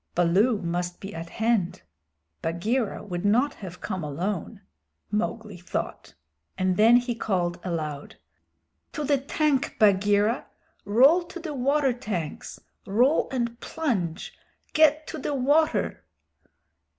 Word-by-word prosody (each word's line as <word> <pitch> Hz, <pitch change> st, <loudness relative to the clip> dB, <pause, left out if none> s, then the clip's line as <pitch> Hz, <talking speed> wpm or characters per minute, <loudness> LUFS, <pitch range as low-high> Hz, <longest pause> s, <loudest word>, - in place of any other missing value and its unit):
"Baloo 195 Hz, +7 st, +3 dB
must 175 Hz, +1 st, -2 dB
be 195 Hz, +1 st, -8 dB
at 165 Hz, +1 st, -7 dB
hand; 220 Hz, -5 st, 0 dB, 0.6 s
Bagheera 205 Hz, +8 st, -1 dB
would 175 Hz, -4 st, -5 dB
not 240 Hz, +8 st, +3 dB
have 180 Hz, -3 st, -10 dB
come 185 Hz, -5 st, -4 dB
alone," 185 Hz, +7 st, -3 dB, 0.5 s
Mowgli 215 Hz, -1 st, -2 dB
thought. 175 Hz, -, -5 dB, 0.4 s
And 185 Hz, -1 st, +1 dB
then 225 Hz, +4 st, +6 dB
he 245 Hz, 0 st, -1 dB
called 180 Hz, -6 st, -1 dB
aloud: 155 Hz, -5 st, -4 dB, 0.8 s
"To 300 Hz, -, -3 dB
the 285 Hz, -1 st, +2 dB
tank, 280 Hz, 0 st, 0 dB
Bagheera. 205 Hz, +2 st, +3 dB, 0.4 s
Roll 265 Hz, -, +5 dB
to 350 Hz, -, -9 dB
the 320 Hz, -3 st, -5 dB
water 275 Hz, 0 st, +2 dB
tanks. 200 Hz, -, -5 dB, 0.3 s
Roll 245 Hz, +10 st, +3 dB
and 235 Hz, -2 st, -2 dB
plunge! 195 Hz, -, -2 dB, 0.4 s
Get 310 Hz, 0 st, +4 dB
to 315 Hz, -, -6 dB
the 285 Hz, +1 st, -2 dB
water!" 290 Hz, +4 st, +1 dB
215 Hz, 120 wpm, -26 LUFS, 180-265 Hz, 0.8 s, then